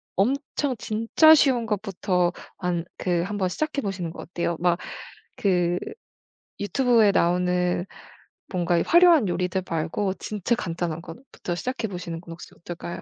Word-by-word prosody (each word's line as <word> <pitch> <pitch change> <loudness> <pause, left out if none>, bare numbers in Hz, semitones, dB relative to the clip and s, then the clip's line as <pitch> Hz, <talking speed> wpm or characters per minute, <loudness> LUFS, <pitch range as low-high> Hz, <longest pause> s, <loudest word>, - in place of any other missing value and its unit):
엄청 270 +4 0
진짜 230 +10 +5
쉬운 260 -6 +3
것부터 195 -4 0 0.3
한 175 -2 -2
그 175 -2 0
한번 195 0 -1
시작해 295 - -2
보시는 185 -6 -3
거 - - -9
어때요? 170 -1 -3
막 175 -1 +2 0.6
그 180 -3 +1 0.8
유튜브에 225 +1 +3
나오는 180 0 +1 0.7
뭔가 175 -2 +1
이 170 - +2
화려한 340 - +6
요리들 180 +1 -1
말고 170 +5 -1
진짜 210 +2 -1
간단한 170 -6 -3
것부터 175 0 -7
시작해 245 +4 -3
보시는 170 -3 -6
건 170 - -12
혹시 165 - -11
어떨까요? 175 0 -7
180 Hz, 295 characters per minute, -25 LUFS, 175-225 Hz, 0.8 s, 화려한